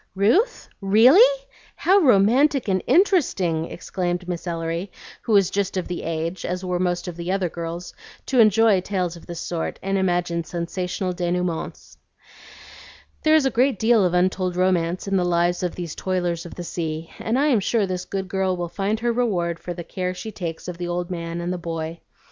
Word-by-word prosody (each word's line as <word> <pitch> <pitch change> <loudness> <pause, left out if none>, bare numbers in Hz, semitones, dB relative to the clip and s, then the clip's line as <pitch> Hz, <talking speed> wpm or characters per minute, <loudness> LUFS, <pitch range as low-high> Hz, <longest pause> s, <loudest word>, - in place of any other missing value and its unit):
"Ruth? 280 - +2
Really? 305 - +6 0.3
How 390 +2 +4
romantic 255 - +4
and 190 -2 +1
interesting!" 250 - +2
exclaimed 180 0 -3
Miss 180 0 -4
Ellery, 165 +2 -3 0.3
who 230 - -4
was 195 -3 +4
just 200 -1 -1
of 185 - -2
the 180 - -4
age, 165 +2 -3
as 180 +1 -3
were 180 -1 -1
most 175 0 -1
of 175 - -5
the 170 +1 -4
other 190 -2 0
girls, 170 +1 -6 0.3
to 260 - +1
enjoy 215 -2 +5
tales 180 -3 -2
of 170 - -14
this 170 -1 -6
sort 170 -2 -3
and 195 0 0
imagine 175 -2 0
sensational 180 +2 -3
denouements. 175 -1 -3 1.2
"There 310 0 +4
is 310 -3 +4
a 270 - +2
great 255 -1 +2
deal 220 0 +4
of 180 -1 +1
untold 185 0 +1
romance 180 0 0
in 195 0 +1
the 180 - +2
lives 175 0 +1
of 180 -1 -2
these 170 -3 -5
toilers 175 -2 -2
of - - -11
the 175 - -6
sea, 165 -1 -4
and 225 +3 -1
I 290 +3 +3
am 245 -6 +4
sure 210 +2 +1
this 185 -1 -4
good 195 -1 -4
girl 190 -1 0
will 175 -1 -3
find 205 +4 -2
her 240 0 +1
reward 180 -8 0
for 175 - -6
the 170 - -6
care 185 +1 -4
she 185 +5 -6
takes 170 -5 -6
of 180 -1 -6
the 175 - -3
old 175 +1 -3
man 170 -1 -4
and 175 +1 -2
the 180 - -4
boy. 165 0 -5
180 Hz, 195 wpm, -23 LUFS, 175-205 Hz, 1.2 s, Really